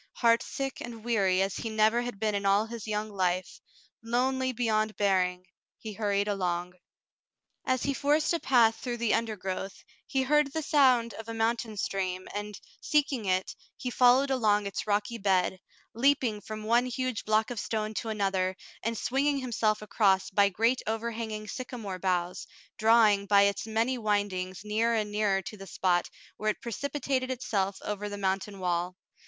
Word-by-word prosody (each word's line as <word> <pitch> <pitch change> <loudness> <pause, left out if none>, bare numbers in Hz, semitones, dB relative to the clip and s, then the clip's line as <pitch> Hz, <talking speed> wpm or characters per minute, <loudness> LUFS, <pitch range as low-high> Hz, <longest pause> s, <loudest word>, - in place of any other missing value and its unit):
Heartsick 240 +3 +1
and 230 -2 -8
weary 195 -5 +2
as 195 - -3
he 225 - -4
never 220 +2 +3
had 245 -4 -5
been 215 -1 0
in 200 0 -1
all 200 +2 +3
his 225 -1 -7
young 215 0 -2
life, 185 -2 -1 0.4
lonely 260 +3 0
beyond 215 -3 0
bearing, 185 -2 +1 0.3
he 215 -1 -7
hurried 205 -1 0
along. 180 -3 -1 0.9
As 255 -1 +1
he 280 - 0
forced 295 +4 +2
a 335 - 0
path 230 -6 +4
through 245 -2 -4
the 235 -2 +1
undergrowth, 195 -4 -3 0.2
he 265 -1 0
heard 295 +1 +3
the 320 - -2
sound 260 -7 +4
of 225 0 -9
a 230 - -4
mountain 225 -1 -1
stream, 185 -2 -2
and, 205 0 -5 0.2
seeking 280 -6 +1
it, 185 0 0 0.2
he 250 - -4
followed 255 +3 +4
along 210 -5 +2
its 200 +1 -4
rocky 210 +3 0
bed, 190 -2 +1 0.3
leaping 245 -3 +2
from 215 0 -7
one 235 +3 +3
huge 255 -2 -2
block 215 +2 +1
of 240 - -4
stone 215 0 -2
to 225 - -4
another, 195 -3 0 0.2
and 230 0 -2
swinging 280 +5 +1
himself 220 -5 0
across 195 -3 +2
by 200 +1 +4
great 230 +6 +1
over 225 +2 -1
hanging 220 -2 -5
sycamore 225 -6 -6
boughs, 180 -1 -1 0.3
drawing, 215 -3 +5
by 200 0 +6
its 200 +2 0
many 230 +3 0
windings, 200 -4 -1
nearer 225 +2 +1
and 210 -2 -1
nearer 205 -2 +1
to 210 +5 -8
the 195 0 -10
spot 175 0 +1 0.3
where 215 - 0
it 215 - -2
precipitated 265 +1 -2
itself 200 -6 -1
over 210 0 -3
the 205 - -6
mountain 195 +1 -2
wall. 180 -1 -1
215 Hz, 170 wpm, -29 LUFS, 200-240 Hz, 0.9 s, by